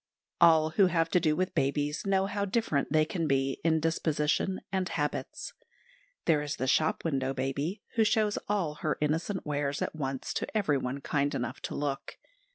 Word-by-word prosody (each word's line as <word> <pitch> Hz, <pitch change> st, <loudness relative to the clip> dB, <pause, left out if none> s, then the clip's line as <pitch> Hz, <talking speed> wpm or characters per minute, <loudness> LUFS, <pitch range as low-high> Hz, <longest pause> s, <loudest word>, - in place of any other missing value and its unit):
All 160 Hz, -2 st, +6 dB
who 190 Hz, +3 st, +5 dB
have 165 Hz, -2 st, +1 dB
to 180 Hz, -, +4 dB
do 155 Hz, -3 st, +2 dB
with 185 Hz, +2 st, -1 dB
babies 145 Hz, +2 st, 0 dB
know 195 Hz, -1 st, +3 dB
how 200 Hz, 0 st, -2 dB
different 195 Hz, -10 st, 0 dB
they 155 Hz, 0 st, +4 dB
can 165 Hz, 0 st, -2 dB
be 135 Hz, -1 st, 0 dB
in 160 Hz, -1 st, +3 dB
disposition 160 Hz, +3 st, 0 dB
and 190 Hz, -2 st, -1 dB
habits. 150 Hz, -2 st, -3 dB, 0.7 s
There 155 Hz, -3 st, +3 dB
is 150 Hz, 0 st, -3 dB
the 130 Hz, -, -2 dB
shop 155 Hz, +6 st, +2 dB
window 135 Hz, -4 st, 0 dB
baby, 140 Hz, +9 st, -2 dB
who 225 Hz, -, +6 dB
shows 215 Hz, -1 st, +2 dB
all 190 Hz, -7 st, 0 dB
her 155 Hz, -, 0 dB
innocent 160 Hz, +6 st, -1 dB
wares 145 Hz, -1 st, -1 dB
at -, -, -3 dB
once 135 Hz, -3 st, -3 dB
to -, -, -2 dB
everyone 140 Hz, -8 st, 0 dB
kind 145 Hz, 0 st, 0 dB
enough 125 Hz, +2 st, -3 dB
to -, -, -5 dB
look. 140 Hz, -1 st, -3 dB
155 Hz, 175 wpm, -30 LUFS, 140-180 Hz, 0.7 s, All